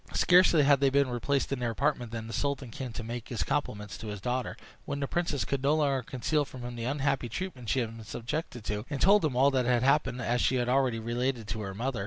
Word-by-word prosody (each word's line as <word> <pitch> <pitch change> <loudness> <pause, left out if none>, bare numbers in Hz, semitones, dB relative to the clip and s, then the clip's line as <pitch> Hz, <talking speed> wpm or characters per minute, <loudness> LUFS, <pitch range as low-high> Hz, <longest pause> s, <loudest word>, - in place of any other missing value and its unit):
Scarcely 180 -4 +5
had 140 -1 +5
they 140 -1 +4
been 140 -1 +2
replaced 135 +4 0
in 135 - -3
their 120 -1 -1
apartment 125 -1 -1
than 115 -1 -5
the 115 - -7
sultan 140 -4 -2
came 130 -1 -6
to 115 - -5
make 120 +1 -6
his 120 - -1
compliments 105 -8 -3
to 110 - -7
his 105 -1 -5
daughter, 125 +5 -2 0.3
when 140 - -4
the 140 - 0
princess 170 -4 -1
could 140 -1 -2
no 140 +3 +3
longer 140 -4 +1
conceal 135 +5 -1
from 130 -3 -10
him 120 0 -6
the 115 -1 -4
unhappy 135 -2 0
treatment 125 - -5
she 130 - +2
had 115 -1 -4
been 115 - -9
subjected 120 +2 -5
to, 105 0 -3
and 140 -2 -3
told 200 +4 +5
him 150 -5 0
all 135 +3 +5
that 130 -3 +1
had 125 -1 +3
happened, 140 -2 +2
as 120 0 0
she 130 - +2
had 120 -1 0
already 130 -2 +2
related 120 +2 -1
it 110 - -13
to 110 - -3
her 95 -2 -5
mother. 125 +2 -2
125 Hz, 260 wpm, -29 LUFS, 115-140 Hz, 0.3 s, Scarcely